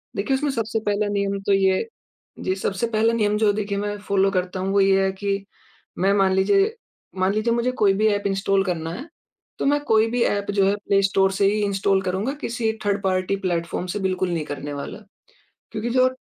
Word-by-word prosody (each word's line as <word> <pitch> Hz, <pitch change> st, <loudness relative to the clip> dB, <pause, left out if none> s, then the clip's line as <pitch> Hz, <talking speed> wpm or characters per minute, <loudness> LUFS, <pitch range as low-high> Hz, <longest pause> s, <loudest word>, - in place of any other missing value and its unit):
देखिए, 240 Hz, +7 st, 0 dB
उसमें 290 Hz, +1 st, -1 dB
सबसे 225 Hz, -3 st, -2 dB
पहला 205 Hz, 0 st, +1 dB
नियम 200 Hz, 0 st, -1 dB
तो 200 Hz, -, +4 dB
ये 190 Hz, -, +2 dB, 0.5 s
जी। 185 Hz, -, -1 dB
सबसे 195 Hz, +3 st, -2 dB
पहला 225 Hz, 0 st, +2 dB
नियम 210 Hz, -2 st, +1 dB
जो 215 Hz, -1 st, +3 dB
देखिए 200 Hz, -1 st, -2 dB
मैं 205 Hz, 0 st, -3 dB
फॉलो 195 Hz, -1 st, +1 dB
करता 185 Hz, 0 st, -2 dB
हूँ, 190 Hz, +1 st, -1 dB
वो 200 Hz, -, +4 dB
ये 195 Hz, 0 st, +4 dB
है 190 Hz, -, +1 dB
कि 195 Hz, 0 st, -3 dB, 0.5 s
मैं 195 Hz, +2 st, +3 dB
मान 195 Hz, -2 st, +3 dB
लीजिए 395 Hz, -, +2 dB, 0.4 s
मान 190 Hz, +1 st, +2 dB
लीजिए 215 Hz, +2 st, +1 dB
मुझे 240 Hz, +2 st, 0 dB
कोई 200 Hz, -2 st, +5 dB
भी 215 Hz, +3 st, +2 dB
ऐप 205 Hz, -1 st, +1 dB
इंस्टॉल 195 Hz, 0 st, +1 dB
करना 165 Hz, -3 st, -2 dB
है, 265 Hz, -, -7 dB, 0.5 s
तो -, -, -1 dB
मैं 290 Hz, +1 st, +3 dB
कोई 220 Hz, -2 st, +3 dB
भी 245 Hz, -, 0 dB
ऐप 200 Hz, 0 st, 0 dB
जो 200 Hz, -1 st, +2 dB
है 200 Hz, -, +2 dB
प्लेस्टोर 195 Hz, -1 st, +3 dB
से 195 Hz, -, +1 dB
ही 210 Hz, -, 0 dB
इंस्टॉल 195 Hz, -1 st, +1 dB
करूँगा, 190 Hz, +9 st, -1 dB
किसी 230 Hz, -1 st, -1 dB
थर्ड-पार्टी 195 Hz, -1 st, 0 dB
प्लेटफॉर्म 175 Hz, 0 st, -2 dB
से 205 Hz, -, -3 dB
बिल्कुल 185 Hz, -1 st, -1 dB
नहीं 165 Hz, -2 st, -1 dB
करने 145 Hz, 0 st, -6 dB
वाला। 145 Hz, +8 st, -6 dB, 0.7 s
क्योंकि 220 Hz, +2 st, -3 dB
जो 255 Hz, +1 st, +4 dB
200 Hz, 205 wpm, -23 LUFS, 190-215 Hz, 0.7 s, कोई